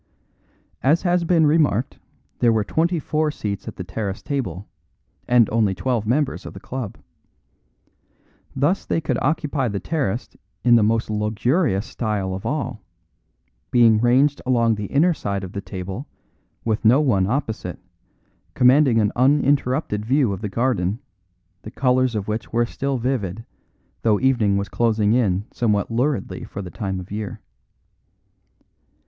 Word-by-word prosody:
As 155 +7 +3
has 175 -1 +2
been 165 -2 +4
remarked, 145 -6 +1 0.4
there 120 - +4
were 110 -2 +2
twenty 170 - 0
four 155 0 0
seats 105 -9 -5
at - - -6
the 90 - -6
terrace 95 +2 -4
table, 105 - -3 0.6
and 120 -3 +5
only 105 -4 +2
twelve 115 +2 -1
members 135 +4 0
of - - -9
the - - -8
club. 125 -5 -6 1.6
Thus 145 +9 +1
they - - -1
could 160 - -1
occupy 145 -2 0
the 100 -3 -2
terrace 130 -7 -3 0.3
in 120 - +5
the 115 - +5
most 110 +1 +1
luxurious 110 - 0
style 105 -6 -2
of 95 +4 -5
all, 140 -5 -3 0.9
being 115 -3 +5
ranged 130 +5 +3
along 115 -3 +2
the 105 -1 -4
inner 165 +6 +3
side 100 -9 -3
of 95 - -6
the 100 - -4
table, 95 +8 -6 0.6
with 110 -2 0
no 120 +5 +6
one 105 -11 +2
opposite, 110 -7 -3 0.8
commanding 130 -1 +5
an 105 -1 +2
uninterrupted 135 -3 +2
view 130 -2 +2
of 95 - -6
the 105 - -3
garden, 110 -4 0 0.6
the - - -8
colours 130 0 +1
of 105 -2 -3
which 110 +1 -4
were 120 +1 +2
still 135 +3 -2
vivid, 115 -4 -2 0.6
though 110 -3 +2
evening 120 -7 +2
was 100 0 -2
closing 110 0 +1
in 105 -5 +1
somewhat 105 -2 0
luridly 125 -1 -1
for 100 - -7
the 90 - -8
time 95 -3 -3
of 90 +1 -10
year. 105 0 -5
115 Hz, 150 wpm, -22 LUFS, 105-135 Hz, 1.6 s, no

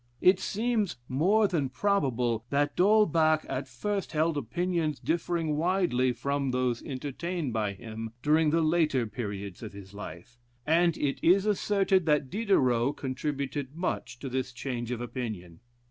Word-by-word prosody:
It 185 +1 +5
seems 215 -1 0
more 195 +11 +3
than 155 -8 -1
probable 125 - 0
that 145 +1 +1
D'Holbach 165 -6 +4
at 130 +1 -3
first 195 +12 -3
held 160 +1 +2
opinions 160 +3 -1
differing 165 -2 -1
widely 165 -7 +2
from 140 +3 -1
those 125 -2 0
entertained 145 +2 -4
by 105 -3 0
him 110 +2 -7
during 155 +1 +4
the 165 +2 +2
later 155 -6 +2
periods 100 -4 -6
of 110 -3 -7
his 100 -1 -11
life, 100 +4 -9 0.3
and 170 +1 +3
it 140 -2 -1
is 190 +4 +5
asserted 195 -3 +2
that 150 -3 +2
Diderot 140 - +2
contributed 140 0 -3
much 170 -7 -3
to 140 - -4
this 130 0 -2
change 120 -2 -4
of 120 -1 -3
opinion. 110 -9 -5
145 Hz, 145 wpm, -29 LUFS, 125-175 Hz, 0.3 s, It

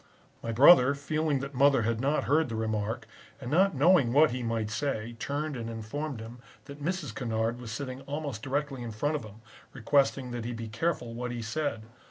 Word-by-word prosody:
My 115 - -3
brother, 140 +2 +7
feeling 150 0 -1
that 140 +1 -6
mother 135 -2 +4
had 115 +1 0
not 145 +3 +1
heard 155 0 +2
the 115 - -4
remark, 110 +1 -2 0.3
and 125 -2 -6
not 190 +2 +4
knowing 145 -3 +4
what 150 +1 +6
he 125 +1 -3
might 115 -2 -2
say, 120 -2 -2
turned 145 +3 -2
and 115 -2 -5
informed 115 +5 -5
him 115 +2 -9 0.3
that 140 0 -10
Mrs. 170 -7 -2
Kennard 115 0 -2
was 115 -2 -7
sitting 130 +2 -5
almost 140 -5 -4
directly 135 0 -2
in 120 - -5
front 145 +8 -1
of 145 - -3
him, 110 +1 -13 0.3
requesting 135 0 +1
that 120 -1 -4
he 120 +1 -4
be 115 -1 -6
careful 120 0 -2
what 125 +1 -4
he 120 -1 -4
said. 115 -1 -2
125 Hz, 200 wpm, -29 LUFS, 115-145 Hz, 0.3 s, brother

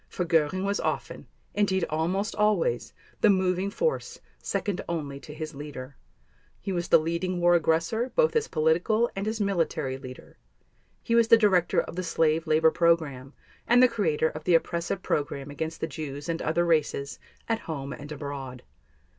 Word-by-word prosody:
For 180 - -3
Göring 165 +2 +1
was 200 +1 0
often, - - -3 0.3
indeed 190 -3 +1
almost 180 +7 -1
always, 215 - +1 0.3
the 215 - +5
moving 185 0 +2
force, 475 - -2 0.2
second 200 -3 -2
only 145 -5 -3
to 150 - -11
his 155 +1 -6
leader. 140 -2 -8 0.6
He 195 - -4
was 175 -2 -2
the - - +7
leading 170 +3 -2
war 175 0 +4
aggressor, 170 +9 +1
both - - +3
as 455 -1 +2
political 175 +9 +1
and 195 +2 -3
as 220 +1 -2
military 165 -9 -1
leader; 130 -1 -11 0.6
he 230 - -1
was 230 -1 +5
the 230 -1 +8
director 190 -6 +3
of - - -3
the - - 0
slave 165 -1 +1
labor 160 +1 +4
program 155 -6 +1 0.3
and 245 +2 +6
the - - +8
creator 170 -10 0
of 155 - -8
the 175 +1 +4
oppressive 170 +3 -1
program 145 -3 -2
against 160 +3 -5
the - - +1
Jews 145 -2 -6
and 165 -1 -2
other 170 +2 +1
races, 150 -4 0 0.3
at 225 -1 0
home 140 -3 -4
and 145 0 -9
abroad. 135 -4 -6
170 Hz, 170 wpm, -27 LUFS, 150-200 Hz, 0.6 s, the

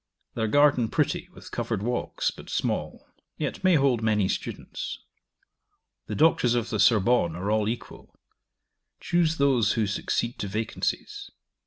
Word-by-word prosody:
Their 110 -1 -1
garden 145 -1 +4
pretty, - - -1
with - - -13
covered 95 - -2
walks, 120 +2 -1
but - - -13
small; - - -2 0.3
yet 155 +4 -4
may 185 -2 +5
hold 135 -5 +3
many 105 -3 +2
students. - - -5 1.1
The - - -4
Doctors 135 -6 +3
of 120 -1 -1
the 110 - -1
Sorbonne 105 -4 +3
are 95 +4 -2
all 110 -1 +1
equal: 115 - -8 0.8
choose 165 -2 +1
those 130 -7 +3
who 110 - +1
succeed 115 +4 -2
to 100 - -3
vacancies. 110 +3 -3
115 Hz, 140 wpm, -26 LUFS, 105-140 Hz, 1.1 s, may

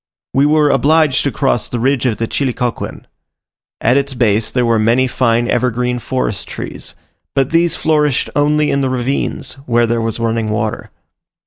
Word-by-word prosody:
We 140 +2 +3
were 150 -1 +3
obliged 150 +1 +3
to 140 - +1
cross 130 -5 0
the 120 - -3
ridge 130 +1 +1
of 115 - -1
the 115 - -1
Chilicauquen. 125 -3 -3 0.7
At 125 +4 +3
its 140 -1 -1
base 110 -2 +1
there 125 -1 0
were 115 -1 +2
many 115 +4 +3
fine 120 -2 +1
evergreen 125 0 0
forest 120 -3 -3
trees, - - -7 0.4
but 135 +1 +1
these 170 +1 +2
flourished 150 -4 +1
only 150 +1 +2
in 140 - +1
the 135 - 0
ravines, 130 +1 -2
where 120 -1 +3
there 115 0 0
was 115 0 -2
running 115 -1 -1
water. 105 0 -3
125 Hz, 165 wpm, -16 LUFS, 115-140 Hz, 0.7 s, We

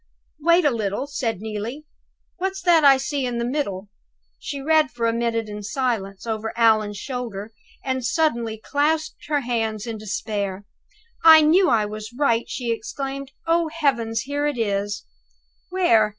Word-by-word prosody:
"Wait 340 +3 +4
a 290 - +5
little," 215 +1 -2
said 230 -8 -3
Neelie; 220 +7 -5 0.5
"what's 385 +1 -2
that 340 -3 +5
I 275 -2 +8
see 275 +1 -2
in 245 -1 -2
the 235 - -1
middle?" 205 -8 -3 0.5
She 285 - -5
read 310 +2 +3
for 235 -1 -3
a 230 - +2
minute 230 -1 -1
in 210 0 -6
silence, 210 -4 -2
over 220 0 -3
Allan's 215 -3 +3
shoulder, 225 -4 -5 0.3
and 260 -1 -1
suddenly 235 -4 0
clasped 305 +6 -1
her 295 -1 +1
hands 225 -4 -2
in 225 -2 -5
despair. 205 -2 -3 0.6
"I 320 -1 +10
knew 345 +4 +5
I 225 -4 +3
was 215 +2 -7
right!" 235 -5 +1
she 240 -3 -2
exclaimed. 270 +4 -4
"Oh, 335 0 +2
heavens, 235 -8 0
here 285 +2 -1
it 290 -4 -2
is!" 205 -2 -1 0.6
"Where?" 235 - +3
235 Hz, 155 wpm, -23 LUFS, 215-290 Hz, 0.6 s, I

